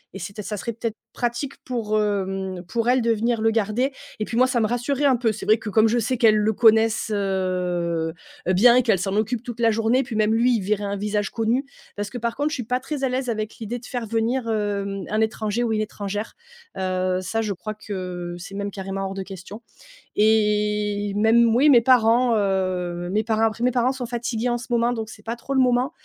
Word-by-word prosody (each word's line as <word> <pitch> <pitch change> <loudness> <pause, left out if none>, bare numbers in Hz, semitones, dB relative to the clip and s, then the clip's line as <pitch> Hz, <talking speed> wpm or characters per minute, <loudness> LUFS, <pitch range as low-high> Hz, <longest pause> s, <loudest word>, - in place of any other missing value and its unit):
et - - -6
c'était 200 +3 -6
ça 210 +1 -4
serait 235 +4 -4
peut-être 230 0 -3 0.2
pratique 245 +3 -2
pour, 220 -4 -1
hem, 195 -3 -2
pour 230 +3 -1
elles 250 +1 +4
de 230 0 +2
venir 230 +1 0
le 225 - +3
garder 225 +4 0 0.3
et 215 - -1
puis, 230 - -4
moi, 255 - +6
ça 250 -2 0
me 220 - +2
rassurait 245 +5 -1
un 270 -2 +5
peu. 235 -2 +1
C'est 215 - -7
vrai 215 - +5
que, 220 -1 -6
comme 220 +2 +5
je 230 +2 +1
sais 245 +2 0
qu'elles 225 -3 +5
le 210 +1 +2
connaissent, 220 0 +4
heu 200 -2 0 1.1
heu, 185 - +3
bien 235 +6 +6
et 255 - +4
qu'elles 220 -6 +2
s'en 195 +2 -2
occupent 220 +2 -1
toute 240 -2 -7
la 230 -1 +4
journée, 225 +4 +2
puis, 240 -3 -6
même 215 0 +2
lui, 240 +2 +3
il - - -3
verrait 205 +2 -1
un 200 0 -2
visage 205 0 -1
connu. 235 +4 0 0.3
Parce 205 0 -4
que, 245 - -6
par 235 0 -2
contre, 290 +2 0
je - - -5
suis 250 - -4
pas 250 +3 -1
très 275 +1 -5
à 265 - +2
l'aise 255 0 -2
avec 215 -1 -3
l'idée 235 +2 -5
de 240 - -14
faire 245 -2 -4
venir, 230 +3 0
hem, 200 -2 -2
un 215 +1 +1
étranger 220 +1 -1
ou 235 - 0
une 215 - 0
étrangère, 205 0 -4 0.4
heu, 185 0 0
ça 225 +5 -2
je 215 -2 -2
crois 215 +3 -6
que, 180 -4 -6
c'est 180 +3 -9
même 200 0 -3
carrément 195 0 -4
hors 190 - -4
de 195 0 -4
question 195 +3 -10 0.5
et 210 -1 +2
même, 225 +2 +4
oui, 280 +5 +5
mes 245 -4 +7
parents, 240 0 +4
heu, 185 -3 -1
mes 215 +2 +1
parents. 220 0 0
Après, 225 +1 0
mes 250 - +3
parents 250 +1 +2
sont 260 -2 -5
fatigués, 235 0 -2
en 240 - 0
ce 245 +3 -9
moment. 235 0 +2
Donc, 220 -2 -4
c'est 210 -1 -13
pas 230 +2 -3
trop 250 +3 -5
le 265 - +3
moment 250 +3 +2
220 Hz, 235 wpm, -23 LUFS, 205-240 Hz, 1.1 s, mes